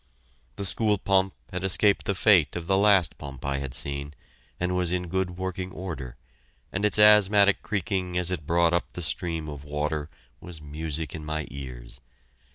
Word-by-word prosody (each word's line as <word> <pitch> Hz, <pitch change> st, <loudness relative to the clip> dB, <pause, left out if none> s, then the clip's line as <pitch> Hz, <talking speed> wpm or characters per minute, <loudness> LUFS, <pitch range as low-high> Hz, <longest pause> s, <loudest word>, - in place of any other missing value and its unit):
The 100 Hz, -, -4 dB
school 105 Hz, +2 st, +1 dB
pump 95 Hz, -1 st, +1 dB, 0.2 s
had 90 Hz, 0 st, -3 dB
escaped 100 Hz, +2 st, +2 dB
the 100 Hz, -, +1 dB
fate 95 Hz, -6 st, +4 dB
of 85 Hz, -2 st, -4 dB
the 95 Hz, +2 st, +2 dB
last 95 Hz, -7 st, +4 dB
pump 70 Hz, -3 st, -8 dB
I 70 Hz, 0 st, -1 dB
had 70 Hz, -2 st, -5 dB
seen, 70 Hz, +1 st, -3 dB, 0.4 s
and 90 Hz, +1 st, 0 dB
was 90 Hz, -2 st, +1 dB
in 90 Hz, -1 st, -2 dB
good 90 Hz, 0 st, -2 dB
working 95 Hz, 0 st, -4 dB
order, 80 Hz, -11 st, -6 dB, 0.5 s
and 95 Hz, -, -2 dB
its 105 Hz, -, +3 dB
asthmatic 105 Hz, -1 st, +6 dB
creaking 95 Hz, -3 st, -2 dB
as 90 Hz, 0 st, +1 dB
it 80 Hz, -5 st, -4 dB
brought 85 Hz, 0 st, +3 dB
up 85 Hz, -, -1 dB
the 90 Hz, -, -5 dB
stream 80 Hz, -1 st, -2 dB
of 75 Hz, -2 st, -7 dB
water 75 Hz, +1 st, -3 dB, 0.3 s
was 85 Hz, -3 st, -8 dB
music 75 Hz, +1 st, -4 dB
in 80 Hz, -, -6 dB
my 75 Hz, 0 st, -3 dB
ears. 65 Hz, -3 st, -9 dB
90 Hz, 175 wpm, -26 LUFS, 75-95 Hz, 0.5 s, asthmatic